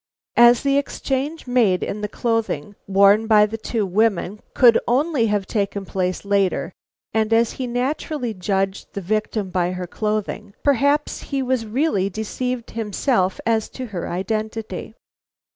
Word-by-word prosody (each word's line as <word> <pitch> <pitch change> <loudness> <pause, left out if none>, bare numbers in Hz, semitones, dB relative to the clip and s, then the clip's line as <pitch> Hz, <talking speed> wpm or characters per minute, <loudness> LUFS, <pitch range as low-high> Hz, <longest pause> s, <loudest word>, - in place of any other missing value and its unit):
As 240 0 +7
the 280 0 +3
exchange 285 +2 -3
made 230 -8 +2
in 210 - -4
the 210 - -1
clothing 220 -7 -2
worn 200 +3 +5
by 210 -1 +6
the 215 +1 -5
two 220 -1 -1
women 205 0 +1 0.2
could 235 -3 +6
only 260 -1 +2
have 205 -2 0
taken 200 -1 -2
place 185 0 -2
later, 200 -2 +1 0.4
and 220 0 +1
as 230 0 +3
he 255 - -4
naturally 250 0 -2
judged 195 0 -2
the 200 - -3
victim 210 0 -2
by 180 0 0
her 180 0 -4
clothing, 210 +1 -3
perhaps 285 +2 +2
he 275 -2 -1
was 250 -3 -1
really 215 -5 +1
deceived 235 +4 -4
himself 210 -2 0
as 225 -1 +1
to 260 - -6
her 175 - -3
identity. 215 +2 -4
220 Hz, 145 wpm, -21 LUFS, 195-245 Hz, 0.4 s, As